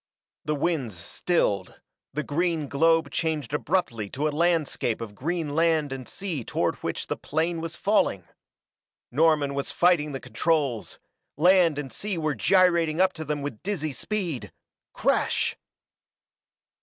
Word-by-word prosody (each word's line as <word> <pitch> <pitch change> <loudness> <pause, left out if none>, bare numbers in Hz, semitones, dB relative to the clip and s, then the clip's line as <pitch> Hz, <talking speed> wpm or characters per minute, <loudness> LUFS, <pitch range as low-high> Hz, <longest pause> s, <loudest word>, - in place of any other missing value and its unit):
The 150 0 0
winds 140 - -1
stilled; 100 - -1 0.3
the 150 +2 -2
green 160 0 0
globe 160 +1 +3
changed 155 -5 -2
abruptly 150 - -1
to 145 +7 -1
a - - 0
landscape 160 -8 +1
of 115 -3 -6
green 160 +5 -2
land 160 -2 +2
and 130 -2 -7
sea 175 -10 -4
toward - - -1
which - - -4
the - - -2
plane 165 +2 -1
was 165 0 -5
falling! 200 - +1 0.9
Norman 150 0 +3
was 140 0 -2
fighting 170 -4 +3
the 135 - -4
controls 130 0 -1 0.4
land 175 -1 +5
and 135 -5 -5
sea 195 - -3
were 155 -2 0
gyrating 170 - +3
up 185 0 +4
to 160 - -6
them 150 -1 -3
with 140 -7 -5
dizzy 175 -7 -2
speed 175 - -3 0.4
crash! - - +1
155 Hz, 140 wpm, -26 LUFS, 140-170 Hz, 0.9 s, land